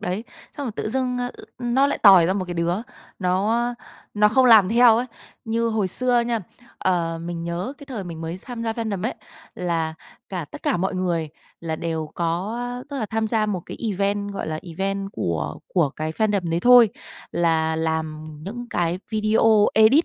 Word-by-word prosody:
đấy, 185 +6 -3 0.3
xong 285 - -3
rồi 230 - -3
tự - - -2
dưng 250 +1 -1 0.4
nó 250 +3 +2
lại - - -1
tòi 190 -5 +8
ra 185 - +2
một 190 -1 -1
cái 175 -1 -5
đứa 170 +1 0 0.4
nó 215 +6 +1 0.4
nó 210 0 +5
không 260 +4 +4
làm 215 -5 +7
theo 235 0 +6
ấy. 245 +2 0 0.4
Như 230 +1 0
hồi 215 -4 0
xưa 245 +4 +2
nha, 235 -1 -1 0.4
ờ, 170 -3 0
mình 170 -1 -4
nhớ 175 +8 -3
cái 285 - -12
thời 230 -8 -5
mình 165 -2 -7
mới 165 +2 -4
tham 235 +3 -7
gia 225 - -1
fandom 220 -5 -3
ấy, - - -1 0.4
là 165 -3 -1 0.3
cả 180 -4 -4
tất - - -9
cả - - +1
mọi 190 +2 -1
người 175 -4 -1 0.3
là 160 -1 -3
đều 160 -2 -3
có, 175 +7 -2 0.3
tức 280 - -4
là, 215 - -2
tham 220 +1 -1
gia 215 -1 +1
một 195 -4 -2
cái - - -7
event, 200 +1 -1
gọi 195 - -4
là, 155 0 -3
event 195 +3 -3
của 75 -3 -2
của 165 -7 +2
cái 155 +2 -4
fandom 200 -3 0
đấy 165 +1 0
thôi. 245 +1 +8 0.4
Là 160 -1 +1
làm 160 -1 -2 0.2
những 240 +6 -6
cái 175 +1 0
video, 215 0 +4
edit 220 +9 +6
195 Hz, 190 wpm, -23 LUFS, 170-225 Hz, 0.4 s, tòi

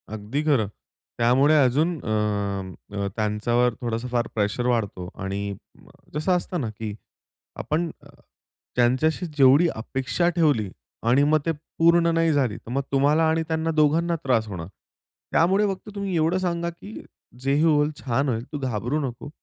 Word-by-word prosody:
अगदी 110 +8 -3
खरं. 135 -9 +2 0.5
त्यामुळे 130 +6 +4
अजून 140 +7 +2
अ, 100 -2 -2
त्यांच्यावर 115 +3 +1
थोडासा 115 +1 -2
फार 120 -1 -1
प्रेशर 105 +3 0
वाढतो 100 -7 -1
आणि 95 +1 -3 0.7
जसं 155 +6 0
असतं 180 -2 0
ना 115 - -2
की 110 -2 -4 0.7
आपण 165 +3 -1 0.9
ज्यांच्याशी 130 +8 +2
जेवढी 140 +5 +6
अपेक्षा 135 +9 -1
ठेवली 150 - +1 0.4
आणि 130 +4 +5
मग 155 +1 +3
ते 165 - +2 0.3
पूर्ण 170 +1 +5
नाही 165 -1 +3
झाली, 130 -7 +1
तर 115 - -11
मग 135 +2 0
तुम्हाला 145 +4 +3
आणि 160 0 +1
त्यांना 160 0 -1
दोघांना 160 +3 +3
त्रास 115 -5 +1
होणार. 90 -4 -6 0.6
त्यामुळे 190 +5 +3
फक्त 190 - -12
तुम्ही 200 -2 -2
एवढं 165 +3 +2
सांगा 170 -2 -1
की 185 +5 -10 0.4
"जे 135 +2 0
ही 150 - +3
होईल, 150 -2 +3
छान 135 +2 0
होईल, 115 -1 -1
तू 145 - -3
घाबरू 125 +2 -1
नको. 120 +3 -8
135 Hz, 150 wpm, -24 LUFS, 115-160 Hz, 0.9 s, जेवढी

